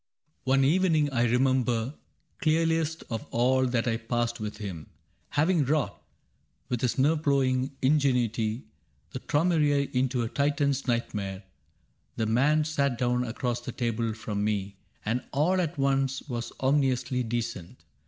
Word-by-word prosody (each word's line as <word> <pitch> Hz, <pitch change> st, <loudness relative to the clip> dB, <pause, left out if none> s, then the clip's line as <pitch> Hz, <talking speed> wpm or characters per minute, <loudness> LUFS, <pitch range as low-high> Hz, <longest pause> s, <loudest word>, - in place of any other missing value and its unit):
" 150 Hz, -, -45 dB
One 135 Hz, 0 st, +4 dB
evening 155 Hz, -1 st, +3 dB
I 120 Hz, -2 st, +2 dB
remember 125 Hz, 0 st, +1 dB, 0.5 s
clearliest 160 Hz, -1 st, +1 dB
Of 115 Hz, -1 st, -4 dB
all 130 Hz, +2 st, +2 dB
that 120 Hz, -1 st, 0 dB
I 115 Hz, -1 st, +1 dB
passed 120 Hz, 0 st, -2 dB
with 105 Hz, 0 st, -5 dB
him. 95 Hz, -8 st, -7 dB, 0.4 s
Having 155 Hz, 0 st, +2 dB
wrought. 150 Hz, 0 st, 0 dB, 0.7 s
With 125 Hz, -2 st, -1 dB
his 125 Hz, +1 st, 0 dB
nerve 150 Hz, +4 st, +3 dB
ploughing 135 Hz, -3 st, +2 dB
ingenuity. 125 Hz, -5 st, +1 dB, 0.5 s
The 130 Hz, -, -5 dB
Traumerei 145 Hz, -2 st, +1 dB
into 125 Hz, -1 st, +1 dB
a -, -, -1 dB
Titan's 140 Hz, +1 st, 0 dB
nightmare. 105 Hz, -5 st, -2 dB, 0.7 s
The 110 Hz, -, -1 dB
man 140 Hz, +8 st, +3 dB
sat 140 Hz, -5 st, 0 dB
down 125 Hz, 0 st, +1 dB
across 120 Hz, 0 st, -2 dB
the -, -, -6 dB
table 115 Hz, -2 st, -2 dB
from 105 Hz, -2 st, -3 dB
me 100 Hz, -2 st, -1 dB, 0.3 s
And 115 Hz, +4 st, 0 dB
all 175 Hz, +7 st, +2 dB
at 165 Hz, -2 st, -3 dB
once 135 Hz, -1 st, +1 dB
was 120 Hz, -3 st, -4 dB
ominously 130 Hz, -2 st, +1 dB
decent. 115 Hz, -6 st, -4 dB
130 Hz, 140 wpm, -28 LUFS, 115-145 Hz, 0.7 s, One